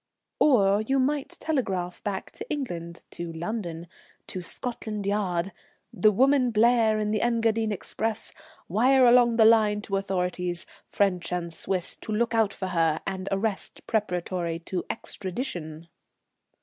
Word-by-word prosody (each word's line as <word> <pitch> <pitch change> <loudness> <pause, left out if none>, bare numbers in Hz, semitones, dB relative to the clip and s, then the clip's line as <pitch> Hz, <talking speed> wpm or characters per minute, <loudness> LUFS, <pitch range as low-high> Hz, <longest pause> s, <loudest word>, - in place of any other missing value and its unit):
"Or 205 -8 +4
you 270 +5 0
might 275 +2 0
telegraph 190 - -2
back 200 -2 -4
to - - -9
England, 170 - -5
to 170 -1 -6
London, 170 -1 -4 0.4
to 185 - -5
Scotland 210 +1 -4
Yard: 195 -3 0 0.4
'The 210 +4 +4
woman 260 +3 +4
Blair 225 -1 +4
in 210 0 -1
the 215 - 0
Engadine 225 -2 +1
express. 220 +2 -3 0.3
Wire 255 +7 +4
along 240 -1 +6
the 225 -1 +6
line 215 -2 +5
to 195 -2 -1
authorities, 180 -2 -2 0.2
French 185 -4 0
and 170 -2 -2
Swiss, 185 +1 -2
to - - -7
look 230 +2 +1
out 220 -3 +3
for 190 -1 -5
her 165 -3 +2
and 190 -1 -4
arrest 195 +1 -2
preparatory 180 -5 -1
to 175 +2 -4
extradition.'" 175 - -5
205 Hz, 135 wpm, -26 LUFS, 180-230 Hz, 0.4 s, along